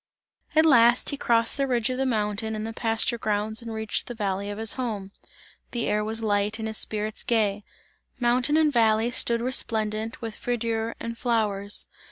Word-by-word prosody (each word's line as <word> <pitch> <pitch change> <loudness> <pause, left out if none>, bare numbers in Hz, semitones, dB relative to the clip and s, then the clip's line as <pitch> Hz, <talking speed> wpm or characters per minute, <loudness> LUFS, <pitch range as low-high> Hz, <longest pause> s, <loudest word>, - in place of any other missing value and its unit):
At 315 +1 +6
last 240 -5 +5
he - - -2
crossed 230 -1 +2
the 275 -1 0
ridge 245 -1 +1
of 255 - -3
the 265 - +1
mountain 220 -1 -1
and 215 0 -4
the 225 - -5
pasture 225 +1 +1
grounds 215 +1 -1
and 230 -1 -7
reached 220 -1 -2
the 245 - -6
valley 200 -2 -2
of 205 - -5
his 225 -1 +2
home; 215 -7 -4 0.6
the 235 -1 -2
air 210 0 0
was 220 +1 -2
light 205 0 0
and 220 -1 -4
his 220 0 +1
spirits 215 0 -2
gay, 210 -3 +1 0.6
mountain 250 +4 +2
and 310 -2 +3
valley 225 0 +3
stood 235 -1 +2
resplendent 220 -3 -1
with 225 -2 -6
verdure 230 -1 -2
and 230 0 -6
flowers. 210 -4 0
225 Hz, 185 wpm, -25 LUFS, 215-240 Hz, 0.6 s, At